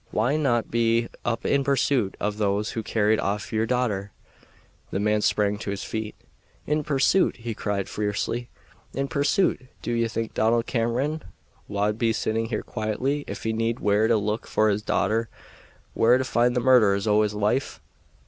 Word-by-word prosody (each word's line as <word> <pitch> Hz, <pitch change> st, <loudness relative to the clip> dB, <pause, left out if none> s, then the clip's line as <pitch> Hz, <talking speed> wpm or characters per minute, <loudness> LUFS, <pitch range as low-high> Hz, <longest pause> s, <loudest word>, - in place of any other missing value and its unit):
Why 120 Hz, +7 st, +1 dB
not 125 Hz, -7 st, +1 dB
be 115 Hz, 0 st, +2 dB
up 115 Hz, -1 st, -2 dB
in 140 Hz, 0 st, +2 dB
pursuit 135 Hz, -6 st, +1 dB
of 105 Hz, 0 st, -2 dB
those 100 Hz, 0 st, 0 dB
who 115 Hz, -, -3 dB
carried 110 Hz, 0 st, +1 dB
off 105 Hz, +3 st, -2 dB
your 110 Hz, +1 st, +1 dB
daughter?" 110 Hz, -6 st, -1 dB, 0.8 s
The 95 Hz, -, -2 dB
man 105 Hz, +1 st, +1 dB
sprang 105 Hz, -1 st, +1 dB
to 110 Hz, -, -5 dB
his 100 Hz, 0 st, -3 dB
feet. 110 Hz, -1 st, -4 dB, 0.5 s
"In 150 Hz, +1 st, 0 dB
pursuit!" 145 Hz, +6 st, +2 dB
he 115 Hz, -1 st, -5 dB
cried 100 Hz, -2 st, -2 dB
fiercely; 105 Hz, +3 st, -2 dB, 0.5 s
"in 135 Hz, +1 st, -1 dB
pursuit! 140 Hz, -, +1 dB, 0.2 s
Do -, -, -2 dB
ye 115 Hz, -1 st, +1 dB
think 115 Hz, 0 st, -4 dB
Donald 115 Hz, +1 st, +2 dB
Cameron 130 Hz, +7 st, -1 dB, 0.5 s
wad 105 Hz, +2 st, -1 dB
be 115 Hz, -2 st, +2 dB
sitting 110 Hz, +1 st, -1 dB
here 110 Hz, -2 st, -3 dB
quietly 130 Hz, +7 st, -2 dB
if -, -, -6 dB
he 110 Hz, -, -1 dB
kenned 115 Hz, +2 st, -1 dB
where 105 Hz, +2 st, +2 dB
to 115 Hz, -, +3 dB
look 105 Hz, +2 st, -2 dB
for 110 Hz, 0 st, +2 dB
his 105 Hz, 0 st, 0 dB
daughter 110 Hz, +2 st, 0 dB, 0.6 s
where 120 Hz, +2 st, +4 dB
to 130 Hz, -, 0 dB
find 120 Hz, -1 st, +1 dB
the 125 Hz, -, +1 dB
murderers 110 Hz, -6 st, +4 dB
o' 105 Hz, 0 st, +4 dB
his 105 Hz, -1 st, 0 dB
wife? 105 Hz, +6 st, 0 dB
115 Hz, 175 wpm, -25 LUFS, 105-125 Hz, 0.8 s, where